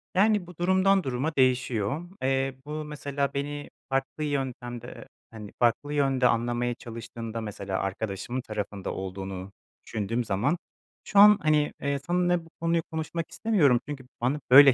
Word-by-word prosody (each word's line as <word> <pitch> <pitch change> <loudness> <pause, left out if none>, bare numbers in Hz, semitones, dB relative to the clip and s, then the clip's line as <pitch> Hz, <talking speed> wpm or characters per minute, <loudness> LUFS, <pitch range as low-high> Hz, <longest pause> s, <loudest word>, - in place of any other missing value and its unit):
Yani, 205 -1 +3
bu 180 -2 -12
durumdan 190 +2 +3
duruma 135 +4 -2
değişiyor. 130 +1 +1 0.2
Eee, 135 0 +1
bu 155 +1 -4
mesela 140 -2 -2
beni 145 +1 -4 0.2
farklı 135 +3 -1
yöntemde, 125 -4 -3
eee, 115 -2 -10 0.3
hani, 105 -2 -9
farklı 120 +5 +2
yönde 135 -3 +3
anlamaya 120 +1 +1
çalıştığımda 115 -1 -6
mesela 100 -3 -4
arkadaşımın 100 +5 -3
tarafında 105 -4 -4
olduğunu 95 0 -5 0.3
düşündüğüm 115 +3 -1
zaman, 115 - +1 0.5
şu 200 - +2
an, 210 0 +10
hani, 150 -2 +2
eee, 140 0 0
seninle 175 -1 +2
bu 165 - -17
konuyu 165 0 +2
konuşmak 160 +1 -3
istemiyorum 160 - +3
çünkü 135 -3 -6 0.2
bana 130 +5 +1
böyle 135 0 +10
135 Hz, 145 wpm, -27 LUFS, 115-155 Hz, 0.5 s, an